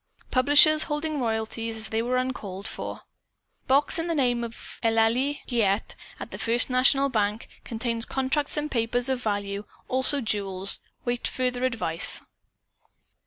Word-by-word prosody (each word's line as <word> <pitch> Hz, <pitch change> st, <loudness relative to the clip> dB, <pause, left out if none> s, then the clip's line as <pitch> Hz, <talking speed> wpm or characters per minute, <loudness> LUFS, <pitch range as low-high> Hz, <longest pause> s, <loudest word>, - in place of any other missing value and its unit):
Publishers 295 Hz, +4 st, +5 dB
holding 300 Hz, 0 st, -2 dB
royalties, 225 Hz, -1 st, -3 dB
as 220 Hz, -, -2 dB
they 220 Hz, 0 st, -1 dB
were 250 Hz, +2 st, -1 dB
uncalled 210 Hz, -6 st, -4 dB
for. -, -, -6 dB, 0.7 s
Box 280 Hz, +5 st, +3 dB
in 330 Hz, -, -2 dB
name 250 Hz, -7 st, 0 dB
of 235 Hz, 0 st, -9 dB
Eulalie 230 Hz, +5 st, +1 dB
Giguette 220 Hz, -4 st, 0 dB, 0.3 s
at -, -, -8 dB
the -, -, -7 dB
First 240 Hz, +3 st, 0 dB
National 270 Hz, +2 st, +4 dB
Bank. 215 Hz, -3 st, -1 dB, 0.2 s
Contains 230 Hz, 0 st, -3 dB
contracts 270 Hz, +3 st, -1 dB
and 300 Hz, 0 st, -2 dB
papers 240 Hz, +2 st, 0 dB
of 260 Hz, -1 st, -1 dB
value, 205 Hz, -2 st, -3 dB, 0.2 s
also 260 Hz, +3 st, +5 dB
jewels. 200 Hz, -5 st, +1 dB, 0.3 s
Await 240 Hz, 0 st, -1 dB
further 250 Hz, 0 st, -1 dB
advice." 220 Hz, -10 st, 0 dB
245 Hz, 135 wpm, -25 LUFS, 220-265 Hz, 0.7 s, Publishers